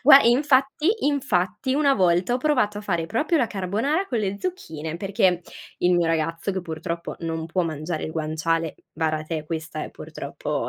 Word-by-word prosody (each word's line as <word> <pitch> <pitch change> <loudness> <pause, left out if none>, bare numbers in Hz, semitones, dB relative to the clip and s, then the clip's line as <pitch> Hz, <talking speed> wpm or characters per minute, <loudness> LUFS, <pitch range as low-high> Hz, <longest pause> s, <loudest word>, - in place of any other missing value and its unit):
Gua 275 +1 +10
infatti 270 +4 +3 0.2
infatti, 260 -3 0
una 280 -1 +4
volta 180 +2 +3
ho - - +1
provato 250 -8 +1
a - - -5
fare 170 -5 -1
proprio 230 - +1
la 250 - +3
carbonara 220 - 0
con 245 - -1
le 200 -1 -1
zucchine, 160 - -4
perché 190 -2 +2 0.4
il 180 - +3
mio 175 -1 +3
ragazzo 165 +3 0
che 190 - -2
purtroppo 170 +1 -5
non 165 -1 -3
può 180 +2 0
mangiare 155 0 -3
il 155 - -5
guanciale 160 +1 -1 0.2
vara 155 -1 0
te! 155 -1 -3
Questa, 160 -1 -4
eh, - - -8
purtroppo - - -4
180 Hz, 175 wpm, -24 LUFS, 165-250 Hz, 0.4 s, Gua